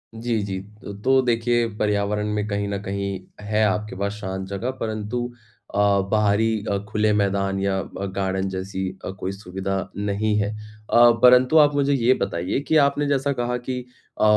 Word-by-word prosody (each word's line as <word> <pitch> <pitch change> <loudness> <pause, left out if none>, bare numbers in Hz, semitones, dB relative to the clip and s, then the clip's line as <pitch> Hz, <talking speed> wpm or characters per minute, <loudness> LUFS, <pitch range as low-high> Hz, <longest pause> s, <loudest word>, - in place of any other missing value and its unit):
जी, 115 -1 -1
जी। 95 -1 -3
अ, 105 +1 -11
तो 130 0 +4
देखिए 120 -1 +1
पर्यावरण 105 0 0
में 105 0 -1
कहीं 100 -1 -2
न 100 - -2
कहीं 100 -1 -3 0.2
है 105 +1 +1
आपके 105 +1 -1
पास 100 +1 -2
शांत 95 -2 -5
जगह 100 +6 -3
परंतु 110 +3 -3 0.4
अ, - - 0 0.3
बाहरी 110 +1 +2 0.2
खुले 110 0 +1
मैदान 100 -1 0
या 95 -1 0 0.3
गार्डन 95 0 -1
जैसी 95 0 -4 0.2
अ, - - -3
कोई 95 - -3
सुविधा 95 0 -4 0.2
नहीं 105 +1 0
है। 105 0 0 0.4
अ, 120 0 +7
परंतु 125 +4 +6
आप 145 -1 +6
मुझे 140 0 +2
ये 125 -1 +4
बताइए 90 +2 -2
कि 160 - +4
आपने 145 +1 -1
जैसा 140 0 +1
कहा 125 -1 -1
कि 125 +1 -4 0.4
अ, - - +4
105 Hz, 165 wpm, -23 LUFS, 100-120 Hz, 0.4 s, अ